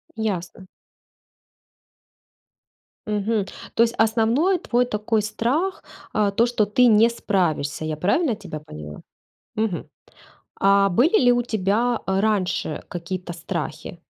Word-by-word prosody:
Ясно. 190 -4 -4 2.4
Мгм. 210 0 0 0.3
То 230 - +5
есть 235 0 0
основной 230 - +2
твой 250 -6 +1
такой 215 -1 0
страх, 250 - -1 0.3
э, 210 -2 +2
то 235 - +4
что 235 -3 +1
ты 245 +5 +4
не 225 +1 +6
справишься, 165 -10 -1
я 155 -1 -3
правильно 225 - +1
тебя 180 -7 -8
поняла? 75 - -10 0.5
Мгм. 215 -5 -2 0.7
А 195 0 +4
были 280 - +3
ли 245 - +6
у 245 - +2
тебя, 220 +2 0
э, 190 0 0
раньше 190 -7 -1
какие-то 175 +1 -5
страхи? 170 -1 -5
210 Hz, 120 wpm, -23 LUFS, 180-235 Hz, 2.4 s, не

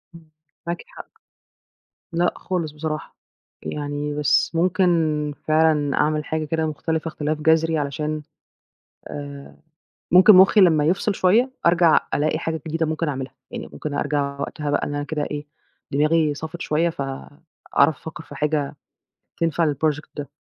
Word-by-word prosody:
إمم، 160 -2 -15 0.4
معاكِ 170 - -3
حق. - - -11 1.1
لأ 175 +1 +2
خالص 170 -5 -3
بصراحة، 155 0 -5 0.5
يعني 145 0 -3
بس 150 -2 +2
ممكن 165 -4 +2
فعلًا 155 -2 +3
أعمِل 150 0 +1
حاجة 160 0 -2
كده 160 +1 -1
مختلفة 160 +1 -2
اختلاف 155 -1 -3
جذري، 160 +1 +3
علشان 150 +1 -2 0.9
آآ 140 -1 -8 0.6
ممكن 185 +4 +8
مُخي 195 +2 +7
لمّا 160 -5 +5
يفصل 195 +4 +1
شوية، 220 +9 +3 0.2
أرجع 170 -2 +5
ألاقي 155 +1 +1
حاجة 160 -1 -3
جديدة 160 0 -1
ممكن 160 +1 -1
أعملها، 135 -2 -4 0.2
يعني - - -6
ممكن 150 -1 -5
أرجع 140 -1 -1
وقتها 150 0 -3
بقى 145 - 0
إن 145 - -4
أنا 145 0 -2
كده 150 0 -3
إيه، 150 0 -5 0.4
دماغي 150 +1 +2
صَفِت 160 +3 -7
شوية 165 +3 +1
فأعرف 145 +1 -2
أفكّر 160 0 -9
في - - -12
حاجة 150 -1 -1 0.6
تنفع 165 -2 +1
للproject 155 +1 -1
ده. 145 - -5
155 Hz, 140 wpm, -22 LUFS, 150-165 Hz, 1.1 s, ممكن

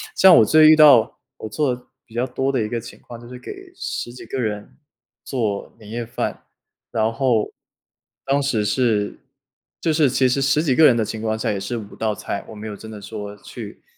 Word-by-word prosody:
像 190 -2 +8
我 110 - +6
最 155 +5 +6
遇 155 - +8
到 145 -7 +6 0.2
我 110 - -7
做 130 +3 0
的 125 - -16 0.2
比 115 - -20
较 120 +2 -1
多 135 +1 -1
的 130 -3 0
一 105 - -4
个 120 - -2
情 115 - -11
况， 120 -1 -11
就 120 - -13
是 125 0 -10
给 380 - -10
10 120 - -5
几 125 - -11
个 130 - -4
人 105 -3 -4 0.5
做 110 -7 -3
年 105 - -13
夜 120 +1 -3
饭， 120 - -4 0.5
然 110 0 +1
后 115 -3 +1 0.7
当 140 +1 +1
时 130 -6 0
是 105 -2 0 0.6
就 165 - +1
是 155 -2 +4
其 130 +1 +2
实 125 - +1
10 140 +2 +2
几 135 -6 +2
个 160 - +6
人 125 - +6
的 115 - +1
情 110 - -5
况 110 0 -1
下 - - 0
也 100 - -2
是 100 +5 -4
5 105 -3 -9
道 110 -1 -1
菜， 100 - -5
我 - - -9
没 105 +1 -7
有 105 - -6
真 110 +2 -10
的 105 -2 -9
说 105 0 -7
去 - - -10
120 Hz, 230 characters per minute, -21 LUFS, 110-135 Hz, 0.7 s, 像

